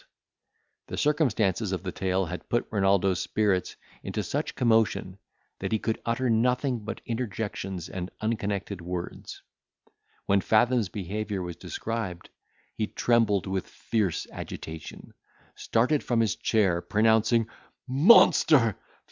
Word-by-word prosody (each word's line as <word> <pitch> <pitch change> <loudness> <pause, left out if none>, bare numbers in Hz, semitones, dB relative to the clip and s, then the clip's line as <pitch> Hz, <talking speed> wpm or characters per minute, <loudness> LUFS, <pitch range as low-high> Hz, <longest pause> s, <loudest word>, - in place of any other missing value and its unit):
The - - -6
circumstances 110 - +1
of 95 -1 -3
the 90 - -3
tale 95 +1 0
had 90 +2 -7
put 120 - +1
Renaldo's 95 -3 +2
spirits 100 -4 0 0.3
into - - -3
such - - -3
commotion, 110 -5 +1 0.4
that - - -3
he 110 - +3
could 110 +1 -2
utter 115 +3 0
nothing 125 +2 +1
but 110 - -6
interjections 100 -6 -4
and 90 -1 -5
unconnected 100 -3 -2
words. 90 0 -6 0.8
When 100 0 +3
Fathom's 115 -1 +2
behaviour 100 +1 -4
was 90 -1 -6
described, 110 -5 -5 0.4
he 110 - -2
trembled 115 -6 +2
with 95 -1 -3
fierce 105 -7 -2
agitation, 80 -1 -8 0.4
started 130 +6 +1
from 120 -2 0
his 110 -3 +2
chair, 95 -6 +1
pronouncing, 110 +2 +3 0.4
"Monster! 140 - +5
110 Hz, 120 wpm, -27 LUFS, 95-115 Hz, 0.8 s, Monster